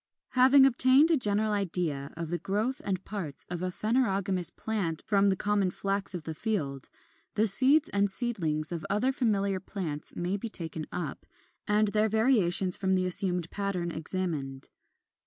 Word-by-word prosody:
18. 255 - 0
Having 265 +1 +7
obtained 265 +4 +5
a - - +4
general 215 -4 +3
idea 175 -8 -1
of 165 -1 -5
the 175 - -2
growth 215 +7 -2
and 190 -2 -4
parts 185 -9 -6
of 175 -1 -4
a 185 - -2
phanerogamous 195 -4 0
plant 195 -8 -4
from 200 -1 +2
the 190 - +1
common 205 -1 0
Flax 195 +1 -1
of 170 - -6
the 160 - -6
field, 150 - -4 0.5
the 215 - +2
seeds 270 +9 +4
and 200 0 0
seedlings 175 -9 -1
of 170 -2 -5
other 210 +6 +1
familiar 200 -7 -1
plants 175 -6 -6
may 180 +3 -2
be 225 +3 -6
taken 160 -5 -1
up, 170 -6 -6 0.4
and 210 0 +2
their 215 +1 +1
variations 205 -6 +3
from 190 -1 0
the 185 0 0
assumed 180 -2 +3
pattern 195 -4 -3
examined. 155 -5 -4
195 Hz, 165 wpm, -28 LUFS, 175-215 Hz, 0.5 s, Having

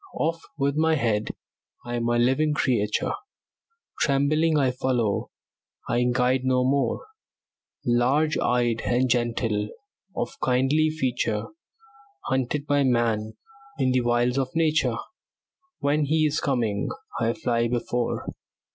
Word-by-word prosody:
Off 165 +1 0 0.2
with 140 -1 0
my 160 +1 +3
head! 110 -6 0 0.6
I'm 120 -1 -2
a 120 - +2
living 135 +5 +2
creature; 115 -8 +1 0.9
Trembling 150 +3 +2
I 135 -3 +3
follow, 125 -5 -1 0.6
I 120 +1 +1
guide 125 +1 +2
no 130 -1 +2
more; 135 -2 0 0.8
Large 130 +6 +2
eyed 120 -2 +1
and 125 +2 +2
gentle, 115 -3 0 0.5
of 270 - -3
kindly 135 +5 +2
feature, 125 -8 -1 0.8
Hunted 130 +2 -1
by 145 -1 +2
man; 115 -4 +1 0.4
in 130 -1 +2
the 130 0 +2
wilds 120 +2 +1
of 130 +2 -3
nature, 155 -7 +2 0.8
When 145 +1 +2
he 155 +2 +2
is 150 0 +1
coming, 115 -7 0 0.3
I 115 0 +1
fly 120 -1 0
before. 120 0 -2
125 Hz, 120 wpm, -25 LUFS, 120-140 Hz, 0.9 s, my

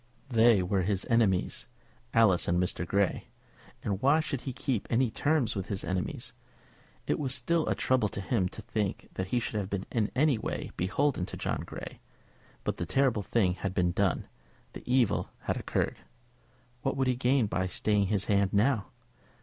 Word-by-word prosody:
They 115 -5 +5
were 95 +1 +1
his 95 +1 0
enemies, 105 -6 +2 0.4
Alice 110 -6 +4
and 85 +1 +2
Mr. 90 -1 -1
Grey, 100 0 +1 0.6
and 100 -1 -2
why 140 +4 +5
should 140 -5 -2
he 135 - -4
keep 125 -3 -2
any 120 0 +2
terms 145 -5 +1
with 95 -1 -3
his 100 -3 -3
enemies? 90 +1 -3 0.7
It - - 0
was 135 -3 +1
still 160 +5 +1
a - - +1
trouble 130 -5 +2
to - - -5
him 95 -2 0
to 110 - -10
think 105 -2 -3
that 95 - -3
he 120 +5 +1
should 115 - -4
have 100 -2 -4
been 100 -1 -3
in 110 -3 +1
any 140 -3 +3
way - - -4
beholden 95 +2 0
to - - -7
John - - -2
Grey; - - -8 0.6
but - - -2
the 85 - -2
terrible 130 -3 +2
thing 95 -3 +1
had 95 +1 -4
been 90 -1 +2
done, 95 0 0 0.5
the - - -8
evil 125 -5 +2
had - - -1
occurred. - - -1 0.8
What 135 - -1
would 135 - +2
he 130 -1 +2
gain 125 0 +2
by 95 -2 -1
staying 100 +2 +1
his 100 0 0
hand 100 -1 +2
now? 105 0 +2
105 Hz, 180 wpm, -29 LUFS, 95-125 Hz, 0.8 s, They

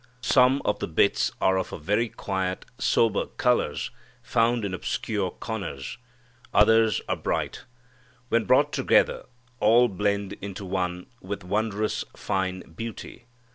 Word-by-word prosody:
Some 130 +3 +4
of 105 - 0
the - - -2
bits 80 - +2
are 95 0 +3
of 95 - -3
very 105 +9 0
quiet 95 -2 -3
sober 115 -3 +2
colors 125 -1 0 0.3
found 115 -1 +1
in 95 - -3
obscure 95 +1 -2
corners. 95 - -6 0.6
Others 110 -1 +5
are - - 0
bright. - - -3 0.6
When 115 -1 +2
brought - - +4
together - - +2 0.3
all 115 +3 +5
blend 100 0 -1
into 100 0 -6
one 90 -1 -2 0.2
with 100 +1 -5
wondrous, 105 +2 -1
fine 95 -2 -2
beauty. 115 +5 -8
100 Hz, 125 wpm, -26 LUFS, 95-115 Hz, 0.6 s, Others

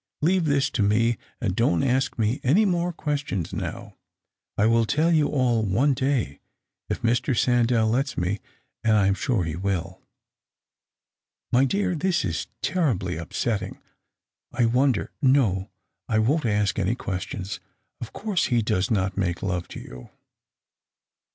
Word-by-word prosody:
Leave 180 +1 +3
this 140 -2 +1
to 115 - -1
me, 115 +4 +3 0.2
and 95 -7 -1
don't 105 -7 +2
ask 130 0 +1
me 115 +5 0
any 175 - +4
more 175 -2 +1
questions 145 - -3
now. - - -5 0.6
I 105 - +3
will 115 0 +3
tell 160 +7 +2
you 155 -2 +3
all 125 -6 +1
one 115 +8 +2
day, 130 - -1 0.5
if - - -3
Mr. 120 +2 +1
Sandell 120 -2 +3
lets 135 +3 -1
me; 90 +4 -1 0.4
and 110 -1 +4
I 100 - +3
am 100 - +3
sure 110 -1 0
he 80 -1 -3
will." 95 -1 -3 1.5
"My 130 +2 +4
dear, 195 +6 0
this 175 -1 0
is 80 -5 -3 0.2
terribly 115 - 0
upsetting. 100 +6 -3 0.7
I 120 - +1
wonder— 125 0 +1
no, 120 -9 +2 0.4
I 110 - +2
won't 125 +5 +2
ask 105 -2 +1
any 100 +4 +1
questions. 95 -1 -5 0.4
Of 120 - -6
course, 205 -4 -1
he 120 -2 +1
does 95 -2 0
not 95 -3 0
make 90 -3 -1
love 90 -3 -2
to - - -8
you." 60 0 -11
115 Hz, 150 wpm, -25 LUFS, 100-140 Hz, 1.5 s, any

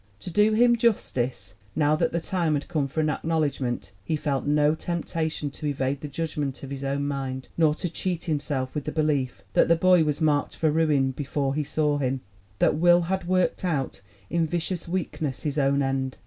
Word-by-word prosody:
'To 180 - -7
do 210 +4 +4
him 240 +2 +5
justice, 125 - 0 0.2
now 150 -1 +3
that - - +1
the 170 - 0
time 165 -2 0
had 145 - -3
come 150 -5 0
for 155 +4 -1
an 155 - +1
acknowledgment, 145 -7 -1
he 155 - -1
felt 145 -2 -1
no 150 +1 +4
temptation 160 -3 -2
to 150 - -5
evade 135 -1 -1
the 150 - -4
judgment 145 -3 -3
of 135 - -7
his 140 0 -5
own 140 +1 -1
mind, 135 -2 -4
nor 155 -2 +3
to 180 - -3
cheat 175 0 -3
himself 145 -5 -2
with 150 -2 -3
the 155 - -2
belief 150 -5 0
that - - +4
the 170 - +5
boy 180 0 +5
was 150 -1 -1
marked 150 -3 +1
for 160 -2 +1
ruin 150 -4 +2
before 140 0 -2
he 150 +1 0
saw 150 0 0
him 130 -1 -1 0.4
that - - +3
Will 175 +1 +5
had 185 +1 -2
worked 185 0 +1
out, 140 - -1 0.3
in 165 -1 +1
vicious 175 +1 -2
weakness, 160 -6 -3
his 150 0 -1
own 140 0 +2
end. 135 -1 -1
150 Hz, 200 wpm, -26 LUFS, 140-165 Hz, 0.4 s, him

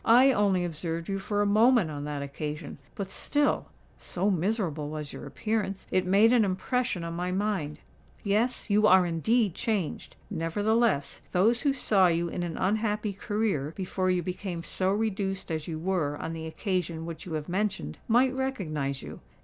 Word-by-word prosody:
"I 250 +4 +7
only 200 -6 +2
observed 165 +1 -4
you 195 0 -1
for 205 +1 0
a - - +1
moment 215 -3 +4
on 145 -1 -5
that 145 -1 -3
occasion; 150 +2 -6 0.2
but 195 -1 -5
still—so 210 -8 -1
miserable 175 -5 -1
was 150 -1 -5
your - - -8
appearance—it 195 +1 -1
made 210 +5 +5
an 240 -3 +5
impression 200 +1 -1
on 170 0 -4
my 180 +2 -2
mind. 185 -7 -1 0.5
Yes—you 215 0 +2
are 185 -2 +6
indeed 200 +5 +1
changed! 210 -8 -2 0.2
Nevertheless, 205 0 +1
those 220 +6 +3
who 285 - +3
saw 205 -8 +3
you 170 0 +1
in 175 - -4
an 170 -2 -3
unhappy 210 +1 0
career, 200 - -1
before 185 -1 -1
you 180 -1 +1
became 180 -1 -4
so 185 +3 -1
reduced 195 -3 -1
as 155 -1 -3
you 160 -2 -3
were 160 -4 -1
on 165 - -4
the 160 0 -5
occasion 170 -2 -2
which 165 +1 -7
you 165 - -5
have 155 -1 -3
mentioned, 195 +2 -2
might 250 +3 +4
recognise 155 - -2
you. - - -8
190 Hz, 165 wpm, -28 LUFS, 165-215 Hz, 0.5 s, I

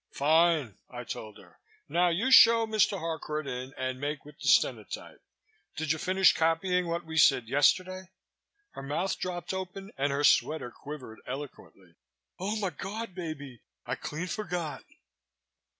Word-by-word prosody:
"Fine!" 155 - +2
I 125 0 -7
told 110 -3 -7
her. - - -19 0.3
"Now 175 +1 +2
you 205 +11 0
show 230 -2 +8
Mr. 215 -2 +2
Harcourt 160 -2 -4
in 125 0 -5
and 130 0 -3
make 145 0 -3
with 150 0 -15
the - - -5
stenotype. - - +1 0.5
Did 160 -1 -1
you 160 - 0
finish 190 +1 +4
copying 175 +2 +1
what 170 0 -3
we 160 0 -1
said 130 -4 +5
yesterday?" 185 +8 +2 0.7
Her - - -9
mouth 170 +7 -2
dropped 180 0 -4
open 190 +2 -6
and 140 +1 +1
her 140 +1 -1
sweater 150 -3 +3
quivered 130 -5 -9
eloquently. 100 - -9 0.4
"Omigawd! 205 +1 -4
baby! 145 - -7 0.2
I - - -3
clean 155 +4 -4
forgot." 175 -7 -4
160 Hz, 140 wpm, -29 LUFS, 140-185 Hz, 0.7 s, show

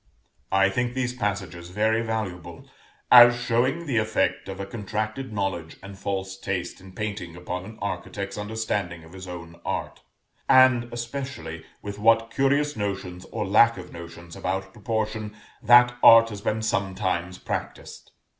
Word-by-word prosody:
I 95 0 +4
think 125 +4 -1
these 125 -1 -1
passages 95 -6 -4
very 110 +4 +1
valuable, 95 -7 -5 0.4
as 120 0 +9
showing 125 +7 0
the 135 -6 -1
effect 110 -2 0
of 95 0 -6
a 100 - -3
contracted 110 +4 -4
knowledge 95 -6 -3
and 100 0 -9
false 95 -1 -4
taste 95 -2 -4
in 95 0 -13
painting 100 -5 -5
upon 90 +1 -5
an 110 +2 -11
architect's 100 0 -4
understanding 105 -5 -3
of 80 +2 -15
his 95 0 -9
own 85 -1 -9
art; - - -4 0.5
and 130 -2 +5
especially 120 - -6 0.2
with 100 0 -6
what 115 +1 +3
curious 145 +2 +1
notions, 95 -3 -4
or 110 -2 -4
lack 110 +4 +5
of 90 -1 -10
notions, 85 0 -10
about 95 +1 -3
proportion, 110 0 -3 0.2
that 120 +1 +7
art 115 0 +8
has 105 -2 -7
been 110 +1 -1
sometimes 95 -4 -1
practised. - - -6
105 Hz, 145 wpm, -25 LUFS, 95-115 Hz, 0.5 s, as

